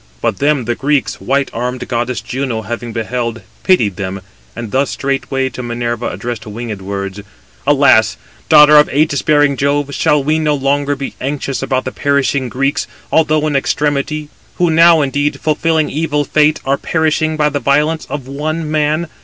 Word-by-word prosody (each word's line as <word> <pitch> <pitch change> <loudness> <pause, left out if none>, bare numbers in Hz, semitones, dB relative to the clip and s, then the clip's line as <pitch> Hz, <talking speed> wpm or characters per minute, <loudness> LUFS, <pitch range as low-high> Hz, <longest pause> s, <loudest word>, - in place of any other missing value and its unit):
But - - -1
them 145 -3 +1
[the 120 - 0
Greeks] 140 +2 -1
white 140 +1 0
armed 125 +2 -3
goddess 120 0 -2
Juno 125 -4 -3
having 120 +1 -5
beheld, 115 +1 -3 0.2
pitied 110 - +2
them, 95 0 -4 0.3
and 115 -3 -6
thus 135 +1 +1
straightway 135 -1 -1
to 125 - -7
Minerva 120 -1 -3
addressed 120 -2 -6
winged 110 -1 -6
words: 100 0 -5 0.5
"Alas! 130 - +4 0.3
daughter 150 0 +8
of 150 - +6
ægis 145 0 +1
bearing 145 -2 +3
Jove, 140 +1 0
shall 150 0 +2
we 155 +3 +1
no 150 -1 +1
longer 145 +1 0
be 140 0 -5
anxious 135 0 -3
about 130 -1 -1
the 130 - -3
perishing 140 -2 0
Greeks, 135 +4 -1 0.2
although 155 -1 +2
in 150 -2 -1
extremity;—who 150 +4 -1
now, 165 0 +6
indeed, 145 +2 -1
fulfilling 160 0 0
evil 150 -1 -1
fate, 155 +1 +2
are 140 +1 +1
perishing 160 -1 0
by 150 -1 +2
the 145 0 -2
violence 150 +3 +1
of 140 -3 -5
one 155 +3 -3
man? 155 +2 0
140 Hz, 160 wpm, -15 LUFS, 125-150 Hz, 0.5 s, daughter